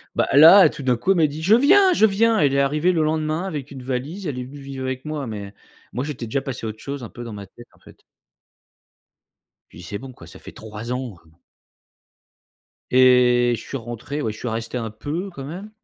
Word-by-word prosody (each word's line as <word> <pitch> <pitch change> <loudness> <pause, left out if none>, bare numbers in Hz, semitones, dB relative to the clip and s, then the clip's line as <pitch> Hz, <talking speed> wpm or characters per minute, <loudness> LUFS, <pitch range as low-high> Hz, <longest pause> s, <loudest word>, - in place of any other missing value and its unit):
Bah, - - +1
là, 165 +7 +9
tout - - -9
d'un 125 -3 +1
coup, 185 - 0
elle 195 - +3
m'a 160 -2 +4
dit: 150 +2 -7
«Je 195 +6 +4
viens! 370 - +5
Je 220 - +4
viens!» 220 +2 +2
Elle 140 -4 +3
est - - +2
arrivée 150 +6 +2
le 165 -3 +1
lendemain 155 +2 -1
avec 150 -8 -5
une 135 -2 -10
valise. 135 +10 -4
Elle 140 -6 -3
est - - -4
venue 140 +3 -11
vivre 135 -1 -7
avec 130 +1 -4
moi, 150 -4 -4
mais 100 -2 -7 0.4
moi, 125 - -2
j'étais 140 -5 -5
déjà 135 +5 -2
passé 130 -4 -6
à - - -2
autre 110 0 -9
chose 140 -2 -6
un 115 - -7
peu 120 - -9
dans 115 -2 -8
ma 100 -1 -8
tête, 120 +4 -16
en - - -25
fait. - - -18 1.7
Je - - -17
lui 85 - -11
dis: - - -10
«C'est 100 - -5
bon 135 0 -10
quoi, - - -14
ça - - -12
fait - - -11
3 110 +2 -8
ans, 125 -5 -5
heu!» - - -23 1.6
Et 125 -1 +5
je 110 - -9
suis 135 - -6
rentré, 120 +5 -6
ouais. 110 - -2
Je 105 - -11
suis 125 - -6
resté 115 +2 -4
un 115 -2 -4
peu, 150 - -5
quand 135 -6 -8
même. 180 +8 -8
135 Hz, 245 wpm, -22 LUFS, 120-155 Hz, 1.7 s, là